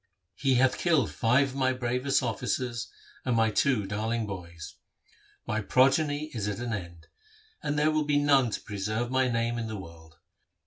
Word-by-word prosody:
He 135 -2 +1
hath 130 +1 +3
killed 160 -9 +2
five 130 +5 +2
of 130 - -10
my 130 -1 +2
bravest 125 +2 0
officers 125 -2 -2 0.3
and 125 -2 0
my 110 -1 +3
two 115 -2 +2
darling 110 +3 -2
boys. 85 -4 -8 0.7
My 110 0 -1
progeny 145 +6 +2
is 105 -4 -3
at 105 - -2
an 120 -1 -3
end, 85 -5 -7 0.6
and 145 0 -2
there 150 +1 +3
will 155 -1 +1
be 145 -1 +2
none 140 -4 +4
to - - -4
preserve 110 +4 -3
my 130 0 +2
name 115 0 0
in 115 - -3
the 110 -1 -5
world.' 85 -4 -12
120 Hz, 175 wpm, -28 LUFS, 105-135 Hz, 0.7 s, none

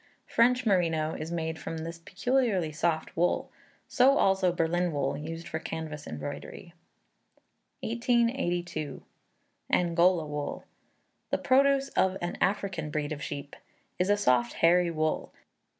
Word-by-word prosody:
French 250 +2 +3
Merino 165 -6 +2
is 155 +2 -5
made 160 -1 -3
from 165 - -5
this 165 +1 -6
peculiarily 190 -1 0
soft 160 +1 -1
wool; 175 +2 +1 0.4
so 270 +2 +4
also 190 -2 +3
Berlin 175 +1 0
wool, 140 -2 -1
used 165 +3 -6
for 160 - -3
canvas 160 -2 -6
embroidery. 145 +4 -7 1.1
1882. 220 - -1 0.7
Angola 175 -1 +3
Wool. 150 -1 -5 0.6
The - - +1
produce 275 +1 +3
of 190 -5 +1
an 175 0 -3
African 190 -5 0
breed 150 0 -2
of 145 -2 -4
sheep; 145 -2 -6 0.4
is 180 +2 +1
a 205 - +4
soft 125 -10 +2
hairy 175 +1 +4
wool. 155 -1 -1
170 Hz, 125 wpm, -29 LUFS, 155-195 Hz, 1.1 s, so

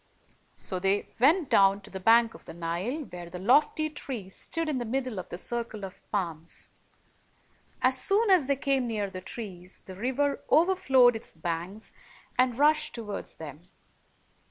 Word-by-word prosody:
So 185 - -3
they 195 +2 0
went 305 +6 +4
down 195 0 +5
to 210 - -13
the 190 - -5
bank 230 +3 +5
of - - -15
the - - -10
Nile, 175 - -3
where 175 -1 -8
the 180 - -7
lofty 295 - +3
tree 255 -9 -6
stood 330 +11 -3
in 290 -4 -1
the - - -2
middle 250 -2 -2
of 180 - -8
the - - -6
circle 230 0 -3
of 190 - -11
palms. 170 -5 -4 1.1
As 255 0 +3
soon 410 +1 +3
as 345 -8 +5
they 280 - +2
came 270 -2 0
near 210 -4 -2
the 185 -1 -7
trees, 185 -3 -8
the 190 - -10
river 265 +7 0
overflowed 285 -9 +5
its 225 - -6
banks 170 +6 -5 0.4
and 250 -2 +2
rushed 300 +1 +3
toward 210 -4 -5
them. 150 -1 -9
230 Hz, 165 wpm, -28 LUFS, 185-270 Hz, 1.1 s, down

